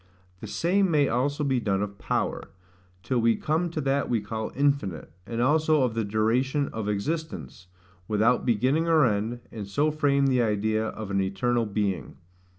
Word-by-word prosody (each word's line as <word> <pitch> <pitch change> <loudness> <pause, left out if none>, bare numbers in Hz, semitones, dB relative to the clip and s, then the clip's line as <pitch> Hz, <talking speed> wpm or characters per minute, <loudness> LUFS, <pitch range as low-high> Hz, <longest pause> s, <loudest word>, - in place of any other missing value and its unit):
The - - -7
same 190 +3 +1
may 150 -4 +3
also 140 +5 0
be 135 -3 +1
done 100 -3 0
of 100 -1 -7
power, - - -2 0.5
till 125 +3 0
we 115 0 +3
come 160 +3 -1
to 165 - -4
that 140 0 0
we 120 - +2
call 110 +1 -5
infinite; 140 - 0 0.2
and 115 0 -4
also 155 +3 +3
of 125 -3 0
the 115 0 -1
duration 120 +7 +1
of 110 -2 -4
existence, 100 - -4 0.4
without 110 +4 +2
beginning 130 +8 +1
or 160 -4 +5
end, 110 +2 -1
and 105 -3 -6
so 145 +9 +1
frame 145 -2 +2
the 130 -2 +3
idea 110 0 0
of 110 -2 -6
an 100 0 +1
eternal 115 +5 0
being. 100 -2 -2
120 Hz, 170 wpm, -26 LUFS, 105-145 Hz, 0.5 s, or